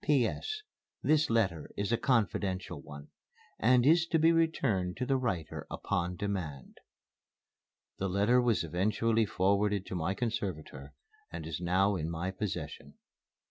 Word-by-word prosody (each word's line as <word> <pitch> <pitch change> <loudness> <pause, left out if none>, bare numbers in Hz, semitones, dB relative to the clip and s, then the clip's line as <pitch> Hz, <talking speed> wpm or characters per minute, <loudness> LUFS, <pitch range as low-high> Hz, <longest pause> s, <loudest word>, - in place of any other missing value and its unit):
"P.S. 150 - 0 0.4
This 155 -1 +3
letter 95 -9 +1
is 100 +2 -1
a - - +4
confidential 100 -6 0
one 70 0 -11 0.5
and 125 +2 +4
is 165 +3 +5
to 165 - +2
be 160 +1 +5
returned 130 - +1
to 125 - -1
the 135 - +2
writer 95 -12 -3
upon 90 +1 -2
demand." 85 -9 -4 1.2
The 95 - -1
letter 105 +7 +3
was 120 -6 +2
eventually 105 +6 +1
forwarded 100 +1 +1
to - - -5
my 90 +3 -1
conservator 95 - -4 0.4
and - - -6
is 80 +1 -5
now 95 +3 +2
in 80 -1 -3
my 85 +3 -3
possession. 95 +1 -5
100 Hz, 140 wpm, -31 LUFS, 90-125 Hz, 1.2 s, is